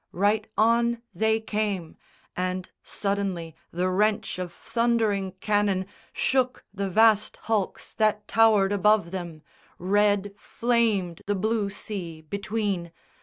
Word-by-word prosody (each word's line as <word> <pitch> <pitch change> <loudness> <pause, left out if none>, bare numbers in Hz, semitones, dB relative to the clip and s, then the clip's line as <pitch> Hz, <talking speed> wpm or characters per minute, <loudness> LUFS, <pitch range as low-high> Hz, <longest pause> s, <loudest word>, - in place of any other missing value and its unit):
Right 205 +3 +1
on 235 +1 +3
they 220 +4 +2
came, 210 -6 -2 0.4
And 185 0 -3
suddenly 195 -5 -3
the 180 +2 -1
wrench 210 +2 +1
of 180 -1 -4
thundering 220 -3 0
cannon 200 -1 0 0.3
Shook 255 -1 0
the 200 0 -2
vast 215 +1 +4
hulks 215 -4 -2
that 215 -1 +1
towered 215 -3 +4
above 205 -3 +3
them. 170 -4 -6 0.3
Red 205 +1 +2
Flamed 220 -8 0
the 205 - +1
blue 215 +1 0
sea 185 -5 -6
between. 200 -1 -2
205 Hz, 115 wpm, -26 LUFS, 185-220 Hz, 0.4 s, vast